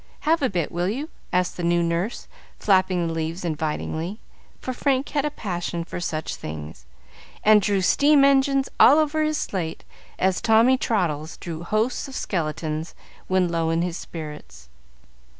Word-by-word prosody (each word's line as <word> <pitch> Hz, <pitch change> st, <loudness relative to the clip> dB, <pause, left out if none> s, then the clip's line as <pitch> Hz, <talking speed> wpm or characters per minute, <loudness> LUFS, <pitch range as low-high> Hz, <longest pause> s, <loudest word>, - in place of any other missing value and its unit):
Have 320 Hz, +1 st, +2 dB
a 265 Hz, -, +2 dB
bit, 175 Hz, -5 st, -2 dB
will 175 Hz, +2 st, -1 dB
you?" 275 Hz, +9 st, -3 dB, 0.2 s
asked 180 Hz, 0 st, 0 dB
the 175 Hz, -, -4 dB
new 170 Hz, 0 st, +2 dB
nurse, 170 Hz, +7 st, -2 dB, 0.3 s
flapping 185 Hz, -3 st, +2 dB
the 165 Hz, -, -2 dB
leaves 165 Hz, +2 st, -3 dB
invitingly. 160 Hz, +4 st, -3 dB, 0.4 s
for 255 Hz, -, -4 dB
Frank 270 Hz, +1 st, 0 dB
had 290 Hz, -1 st, 0 dB
a -, -, +1 dB
passion 175 Hz, -8 st, -4 dB
for 175 Hz, -, -6 dB
such 160 Hz, -3 st, -3 dB
things, 75 Hz, -5 st, -8 dB, 0.6 s
and 215 Hz, 0 st, +6 dB
drew 200 Hz, -1 st, +1 dB
steam 285 Hz, +8 st, +5 dB
engines 275 Hz, 0 st, +3 dB
all 280 Hz, -, +8 dB
over 310 Hz, 0 st, +2 dB
his 310 Hz, 0 st, +1 dB
slate, 170 Hz, -, -3 dB, 0.3 s
as 190 Hz, 0 st, +1 dB
Tommy 230 Hz, +3 st, +5 dB
Traddles 165 Hz, -, -1 dB
drew 165 Hz, -2 st, -6 dB
hosts 215 Hz, +10 st, -1 dB
of 270 Hz, -, -9 dB
skeletons 155 Hz, -2 st, -3 dB, 0.3 s
when 185 Hz, -1 st, +2 dB
low 165 Hz, -1 st, 0 dB
in 165 Hz, +1 st, +1 dB
his 175 Hz, -2 st, -2 dB
spirits. 65 Hz, -, -9 dB
180 Hz, 160 wpm, -24 LUFS, 165-250 Hz, 0.6 s, all